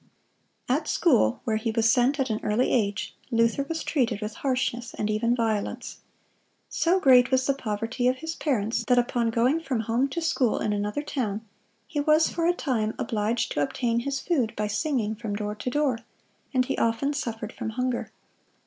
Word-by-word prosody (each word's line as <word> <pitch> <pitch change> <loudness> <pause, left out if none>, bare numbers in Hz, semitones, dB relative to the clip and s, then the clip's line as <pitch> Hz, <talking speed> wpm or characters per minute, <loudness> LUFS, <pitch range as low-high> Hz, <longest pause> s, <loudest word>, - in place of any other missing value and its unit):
At 295 +5 0
school, 185 - +3
where 220 -1 0
he 225 +1 -2
was 225 0 +3
sent 270 +3 +2
at 260 -3 0
an 215 - -1
early 215 +4 +1
age, 205 -4 0
Luther 230 +2 +2
was 325 -1 -2
treated 240 -8 0
with 210 0 -4
harshness 250 -2 -2
and 215 0 -1
even 230 +3 +1
violence. 225 -3 -2 0.7
So 355 +3 +2
great 255 -6 +6
was 260 -1 +2
the 275 - +3
poverty 225 0 -2
of 255 - +3
his 320 +4 -5
parents, 230 -7 -1
that 250 - +4
upon 240 -1 +1
going 245 +7 +2
from 270 -8 -2
home 230 +5 +1
to 305 - -3
school 280 -8 +1
in 210 - 0
another 210 +8 -2
town 225 -7 -3 0.4
he 295 - -3
was 305 +2 +4
for 335 -1 0
a 350 - +4
time 225 -9 -1
obliged 225 0 -1
to - - 0
obtain 235 - 0
his 275 +3 -2
food 270 -11 0
by 210 - -1
singing 220 0 -1
from 215 -2 -4
door 210 0 -3
to 210 +4 -4
door, 270 -3 +1 0.5
and 255 -2 +2
he 270 - -2
often 230 +6 +1
suffered 225 -5 -4
from - - -4
hunger. 250 +2 -2
240 Hz, 185 wpm, -26 LUFS, 220-275 Hz, 0.7 s, great